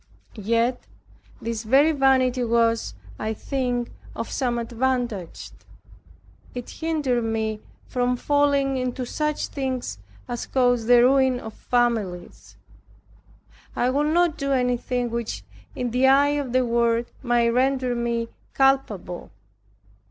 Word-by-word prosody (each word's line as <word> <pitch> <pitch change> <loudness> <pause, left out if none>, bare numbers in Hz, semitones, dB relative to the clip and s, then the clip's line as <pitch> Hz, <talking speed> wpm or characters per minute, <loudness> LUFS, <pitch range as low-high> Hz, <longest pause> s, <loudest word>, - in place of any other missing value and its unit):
Yet 230 +3 0 0.5
this 230 -1 -3
very 270 +8 +4
vanity 260 -3 +3
was, 230 - +1 0.2
I 220 +1 -2
think, 245 -1 -2 0.2
of - - -5
some 245 -3 -1
advantage; 235 -5 -2 1.0
it 245 -1 -6
hindered 295 -7 -1
me 220 -1 -2 0.3
from 250 0 0
falling 280 -1 +2
into 255 0 -2
such 300 +4 -2
things 260 - -3 0.3
as 240 -1 -4
cause 245 -3 +2
the 240 0 +7
ruin 260 -1 +4
of 220 -3 -8
families. 220 -9 -2 1.2
I 250 +1 +1
would 295 +3 +1
not 345 -1 +2
do 275 -1 -1
anything 250 -1 0
which 230 - -4 0.3
in 245 -1 -2
the 255 +3 +3
eye 280 +2 +5
of 290 -3 -2
the 255 0 +2
world, 235 0 +1
might 240 -2 +2
render 255 +1 +1
me 235 -1 -1 0.3
culpable. 265 -10 +1
245 Hz, 120 wpm, -24 LUFS, 230-265 Hz, 1.2 s, the